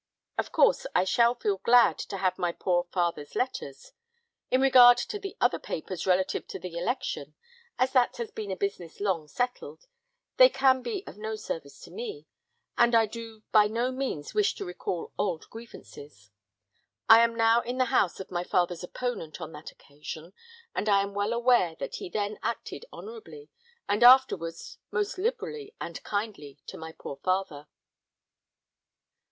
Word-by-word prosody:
"Of - - -2
course - - +3
I - - +4
shall 235 +5 +3
feel 205 -5 -1
glad 235 +4 +4
to 195 - -5
have 185 -1 0
my 175 -1 0
poor 175 0 0
father's 170 -5 -2
letters. 145 - -4 0.6
In 255 - +3
regard 250 -2 +8
to 415 - -4
the 390 -2 -7
other 245 - +2
papers 180 +3 -5
relative 185 0 +1
to - - -6
the 180 -2 -8
election, 220 +10 -3 0.4
as 255 +1 +2
that 255 -2 +3
has 235 -2 -5
been 210 -2 -6
a 190 - -2
business 185 -4 -4
long 185 -7 -1
settled, 250 - -4 0.5
they - - +9
can 265 - +3
be 395 - -4
of - - -11
no 220 +1 -3
service 165 -9 -6
to - - -12
me, 440 -2 -7 0.5
and 235 0 +5
I 225 -1 +5
do 225 0 -9
by 210 -1 +6
no 235 +4 -1
means 255 - -4
wish 420 -1 +2
to - - -6
recall 180 -1 -5
old 180 -6 -1
grievances. 145 - -12 0.8
I 225 0 +9
am 230 0 +3
now 230 +1 +4
in 245 +2 -5
the 255 - +3
house 190 -8 +2
of 190 - -8
my 175 -1 -2
father's 175 -1 0
opponent 180 -6 -5
on 160 -2 -7
that 150 0 -10
occasion, 155 +4 -10 0.4
and 210 - -1
I 200 -1 +4
am 200 0 -6
well 205 +2 -1
aware 235 -8 +3
that - - -5
he - - -7
then 205 +1 -3
acted - - -4
honourably, 440 0 -11 0.4
and 205 +3 +1
afterwards 190 -10 +4
most 415 -3 -2
liberally 445 0 -3
and - - -6
kindly 205 -10 -4
to - - -8
my 160 0 -7
poor 140 - -8
father." 185 -6 -2
210 Hz, 170 wpm, -28 LUFS, 175-250 Hz, 0.8 s, they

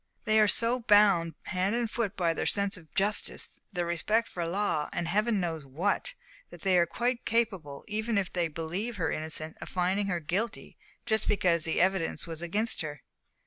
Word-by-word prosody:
they 215 0 +4
are 215 - +6
so 230 +5 +3
bound 205 -7 +4
hand 190 +3 0
and 235 -2 -1
foot 225 -5 -2
by 170 -3 +2
their - - -2
sense 200 -1 +1
of 165 -4 -13
justice, 205 +2 -1 0.2
their 175 -3 -1
respect 210 +7 +1
for 170 -2 -4
law, 170 -5 0
and 170 - -2
Heaven 210 +4 +2
knows 165 -4 -2
what! 180 - -1 0.3
that - - -12
they 190 -2 +3
are 170 - +3
quite 240 +6 -1
capable, 190 -12 -1
even 220 +1 -1
if 195 -2 -1
they 175 -2 +1
believe 170 +9 -4
her 165 -5 -1
innocent, 155 0 -4
of - - -6
finding 190 +3 0
her 180 -3 0
guilty, 200 +9 -3 0.3
just 220 -1 +1
because 175 -5 +2
the 160 - 0
evidence 185 -2 +1
was 165 -1 -7
against 205 +7 0
her." 150 -4 -6
190 Hz, 185 wpm, -29 LUFS, 165-215 Hz, 0.3 s, are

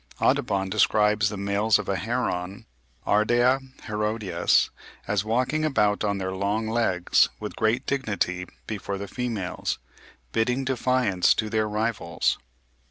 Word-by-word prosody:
Audubon 95 -1 +1
describes 105 +1 +3
the 105 - -5
males 100 +2 +2
of 105 - -6
a 100 - 0
heron 100 -5 -2 0.4
(Ardea 120 +5 +3 0.2
herodias) 105 -5 +1 0.4
as 105 -1 +1
walking 125 +8 0
about 105 -10 +2
on 100 -1 0
their 95 -1 -3
long 100 +3 -1
legs 110 -6 +2
with - - -6
great 115 +4 +1
dignity 100 -9 -1 0.2
before 100 -2 -4
the 100 +1 -6
females, 110 -5 -3 0.5
bidding 125 +4 0
defiance 125 -7 +2
to 110 -2 -2
their 110 -1 +1
rivals. 110 +2 -1
105 Hz, 125 wpm, -25 LUFS, 100-120 Hz, 0.5 s, describes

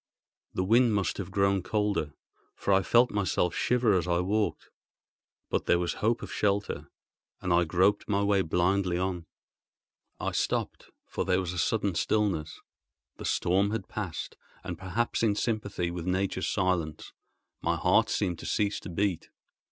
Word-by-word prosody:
The 95 - +1
wind 115 +3 +4
must 100 0 -1
have 95 - -4
grown 100 -1 +2
colder, 105 -7 -1 0.4
for 100 - 0
I 95 - +5
felt 120 +4 +4
myself 95 -3 0
shiver 125 -3 +2
as 90 -2 +1
I 85 -1 +2
walked; 105 +4 -1 0.8
but - - -1
there 85 - +5
was 85 0 -1
hope 115 +2 +1
of - - -7
shelter, 100 0 -1 0.5
and 90 -2 0
I 85 0 +4
groped 90 +5 +2
my 100 -1 +2
way 100 -1 +3
blindly 90 +1 +1
on. 90 -2 -2 0.9
I - - -2
stopped, - - -2 0.2
for - - -3
there 90 - +2
was 90 -2 -3
a 90 - -3
sudden 100 -1 +1
stillness. 90 -4 0 0.6
The - - -7
storm 95 +3 +2
had 105 -2 -3
passed; 95 -7 -5 0.3
and, 90 -2 -4
perhaps 95 +7 -2
in 110 -3 +2
sympathy 100 -6 -2
with 85 0 -5
nature's 95 0 0
silence, 90 -6 -1 0.5
my - - +1
heart - - +3
seemed 90 -5 -1
to - - -7
cease 105 -1 0
to - - -9
beat. 95 0 -1
95 Hz, 160 wpm, -29 LUFS, 90-105 Hz, 0.9 s, I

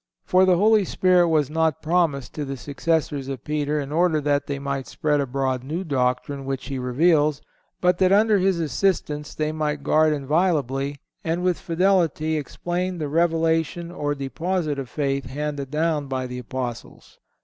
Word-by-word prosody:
"For 185 +1 +4
the 185 -2 +4
Holy 215 +2 +4
Spirit 180 -1 +3
was 150 -3 +2
not 160 -2 0
promised 155 -5 0
to 150 - -4
the 135 -1 -5
successors 145 0 -1
of 135 -3 -5
Peter 150 0 -1
in 140 0 -5
order 165 0 +2
that 145 -1 0
they 140 - -2
might 140 -1 -3
spread 150 -1 0
abroad 130 -1 -1
new 160 +7 -3
doctrine 135 -2 -1
which 135 0 -4
He 135 -1 -3
reveals, 150 +3 +2 0.4
but 180 -1 +3
that, 185 -1 +4
under 210 +1 +4
His 185 -2 +2
assistance, 155 -3 -1
they 155 0 -1
might 150 -2 -2
guard 155 0 +3
inviolably, 145 -2 0 0.3
and 165 +2 -1
with 180 -2 +1
fidelity 165 -3 +1
explain, 175 +4 -3
the 155 -3 -3
revelation 165 +1 +1
or 145 -4 -2
deposit 155 +2 -2
of 130 -3 -6
faith 140 -2 -1
handed 145 +1 -4
down 155 -1 0
by 130 -1 -2
the 125 0 -6
Apostles." 125 -1 -7
150 Hz, 165 wpm, -23 LUFS, 140-170 Hz, 0.4 s, For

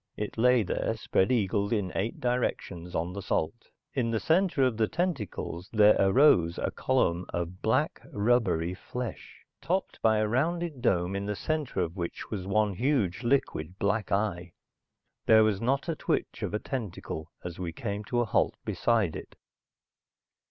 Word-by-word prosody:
It 105 - -4
lay 125 0 +4
there, - - -1
spread 95 - +1
eagled 100 -3 +1
in 100 -5 0
eight 105 +4 -2
directions, 95 -8 -2
on 85 +3 -1
the 100 - -5
salt. 95 +5 -2 0.2
In 125 -4 0
the 115 -1 0
center 165 - +2
of 130 -3 +2
the 110 -1 +2
tentacles 125 - -3
there 105 -1 +6
arose 95 - +5
a - - -1
column 90 -9 0
of 85 +1 -4
black - - +1
rubbery 105 -6 +1
flesh, 120 +3 -7 0.2
topped 190 +2 -2
by 110 -1 +4
a 110 0 +2
rounded 155 +4 -1
dome 90 -2 +1
in 100 +1 -3
the 105 - -1
center 150 -6 -2
of 85 0 -2
which 85 -3 -5
was 95 -4 -4
one 105 0 +2
huge 115 - 0
liquid 105 - 0
black 100 +1 0
eye. 95 -4 -1 0.7
There 110 0 +7
was 105 -3 +1
not 135 +6 0
a 165 - -1
twitch - - -2
of - - -2
a - - 0
tentacle 100 - -5
as 90 -1 -6
we 90 -2 -3
came 100 +3 -4
to 120 +3 0
a - - +1
halt 110 - +1
beside 110 -8 +1
it. - - -9
105 Hz, 165 wpm, -28 LUFS, 90-125 Hz, 0.7 s, There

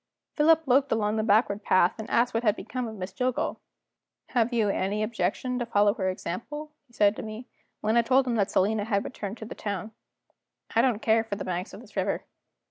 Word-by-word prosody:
Philip 320 +1 +5
looked 270 +2 +3
along 215 -1 +1
the - - +2
backward 210 -1 +2
path, 185 +3 +3
and 220 - -6
asked 240 +1 +2
what 225 - +1
had 215 -3 +2
become 250 0 -4
of 220 - -7
Miss 185 -1 -6
Jillgall. 250 +3 -1 0.7
"Have 240 -1 +1
you 230 -3 +2
any 200 +2 0
objection 250 +3 -1
to 240 - -1
follow 205 -3 +3
her 190 -5 -1
example?" 295 - -5 0.2
he 240 - -27
said 205 -2 +3
to - - -4
me, 220 +3 -7 0.4
when 215 +2 +1
I 235 - +6
told 260 +3 +3
him 245 - -1
that 200 -2 +2
Selina 205 +2 +1
had 200 -3 0
returned 210 -3 -6
to 220 - -8
the - - -7
town. 205 +1 -4 0.8
"I 230 - +6
don't 235 -4 +1
care 225 0 +4
for 225 -3 -4
the 200 - -5
banks 180 +1 -3
of - - -10
this - - -17
river." - - -1
220 Hz, 215 wpm, -27 LUFS, 205-245 Hz, 0.8 s, I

